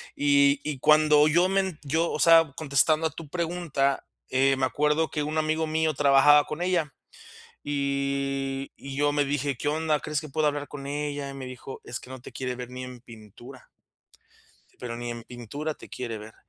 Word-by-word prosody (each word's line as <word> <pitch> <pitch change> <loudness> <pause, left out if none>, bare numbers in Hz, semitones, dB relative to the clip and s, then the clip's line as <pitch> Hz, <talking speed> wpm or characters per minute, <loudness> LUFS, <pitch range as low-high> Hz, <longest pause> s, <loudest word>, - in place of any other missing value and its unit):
y 140 -1 +4
y 150 -3 -3
cuando 150 +1 +5
yo 175 +4 +3
men 190 -4 0
yo, 160 +4 0
o - - -3
sea, 165 -4 +6
contestando 155 +2 +2
a - - -4
tu 155 -1 -10
pregunta, 165 -5 -1 0.2
eh, 135 +1 +3
me 130 0 +1
acuerdo 150 +3 +1
que 150 - -2
un 155 +1 -1
amigo 155 +1 0
mío 155 -1 0
trabajaba 145 +1 +6
con 155 +3 -6
ella, 170 -6 0 0.7
y 140 -1 -2
y 135 -1 -8
yo 145 +1 +2
me 145 -1 +2
dije: 140 -1 -1
"¿Qué 145 - -4
onda?, 155 0 +1
¿crees 150 0 -3
que 155 - -9
puedo 155 +3 0
hablar 145 -1 -1
con 140 -2 -8
ella?", 145 0 -3
y - - -9
me 135 -1 -7
dijo: 130 +1 -9
"Es 120 - -6
que 130 - -13
no 130 -2 -9
te - - -11
quiere 130 -1 -4
ver 125 -1 -7
ni 125 0 -7
en 125 -1 -9
pintura" 120 +3 -14 1.1
"Pero 120 -1 -5
ni 120 0 -5
en 120 0 -6
pintura 140 +6 -6
te - - -14
quiere 115 -3 -5
ver", 110 +1 -11
145 Hz, 195 wpm, -26 LUFS, 135-155 Hz, 1.1 s, sea